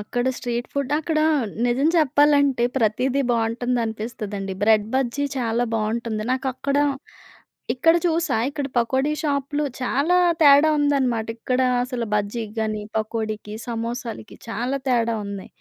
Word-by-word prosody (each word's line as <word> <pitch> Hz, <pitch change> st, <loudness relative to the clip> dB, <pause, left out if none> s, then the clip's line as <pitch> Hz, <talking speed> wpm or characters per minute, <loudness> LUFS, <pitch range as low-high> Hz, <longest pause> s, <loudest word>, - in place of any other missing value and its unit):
అక్కడ 245 Hz, +4 st, -2 dB
street 240 Hz, -1 st, -3 dB
food 280 Hz, 0 st, -2 dB
అక్కడ 315 Hz, 0 st, -1 dB, 0.5 s
నిజం 255 Hz, +5 st, +2 dB
చెప్పాలంటే, 285 Hz, -4 st, +3 dB
ప్రతీదీ 255 Hz, +4 st, +1 dB
బావుంటుందనిపిస్తదండి 225 Hz, -3 st, -2 dB
బ్రెడ్ 215 Hz, -1 st, +4 dB
బజ్జీ 265 Hz, +2 st, 0 dB
చాలా 235 Hz, 0 st, 0 dB
బావుంటుంది. 220 Hz, 0 st, -2 dB
నాకక్కడ 265 Hz, +2 st, -1 dB, 1.0 s
ఇక్కడ 325 Hz, +6 st, +4 dB
చూసా 330 Hz, -3 st, +1 dB
ఇక్కడ 285 Hz, -1 st, -3 dB
పకోడీ 265 Hz, +5 st, +1 dB
షాపులు 290 Hz, 0 st, -1 dB, 0.2 s
చాలా 280 Hz, +7 st, +1 dB, 0.3 s
తేడా 285 Hz, +1 st, +7 dB
ఉందన్నమాట. 265 Hz, -6 st, +1 dB
ఇక్కడ 255 Hz, +2 st, -1 dB, 0.2 s
అసలు 245 Hz, -2 st, -4 dB
బజ్జీకి 210 Hz, +1 st, -2 dB
గాని, 215 Hz, -1 st, -2 dB
పకోడీకి 215 Hz, -1 st, -3 dB
సమోసాలకి 230 Hz, -1 st, -5 dB
చాలా 245 Hz, +5 st, -2 dB
తేడా 235 Hz, -2 st, +2 dB
ఉంది. 200 Hz, -1 st, -6 dB
245 Hz, 115 wpm, -23 LUFS, 225-280 Hz, 1.0 s, తేడా